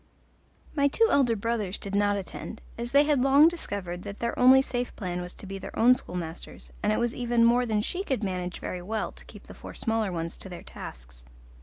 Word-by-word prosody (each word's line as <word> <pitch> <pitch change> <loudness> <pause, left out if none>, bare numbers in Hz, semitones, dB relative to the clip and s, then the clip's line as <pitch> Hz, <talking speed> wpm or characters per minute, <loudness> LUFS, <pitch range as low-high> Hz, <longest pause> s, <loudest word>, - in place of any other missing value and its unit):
My 285 -2 +4
two 450 +11 +3
elder 250 -5 +4
brothers 215 -3 -2
did 200 - -5
not 205 0 +2
attend, 200 +3 -7 0.2
as 235 +1 -3
they 280 +1 +6
had 295 -3 +2
long 275 +4 +7
discovered 200 - -3
that 200 +2 -7
their 235 0 -2
only 255 +1 +8
safe 250 -2 -2
plan 180 -3 -3
was 180 0 -6
to - - -10
be 195 0 -6
their - - -8
own 245 +3 +7
schoolmasters, 175 -8 -6
and 210 - +2
it 215 - +1
was 240 0 0
even 240 -1 +2
more 245 +1 +4
than 210 -2 +1
she 365 - -2
could 265 - -2
manage 180 -2 -3
very 180 - -5
well 215 +4 -3
to - - -12
keep - - -13
the - - -11
four - - -10
smaller 225 -3 0
ones 165 -1 -4
to 190 - -6
their 175 - -8
tasks. - - -10
220 Hz, 220 wpm, -27 LUFS, 185-250 Hz, 0.2 s, only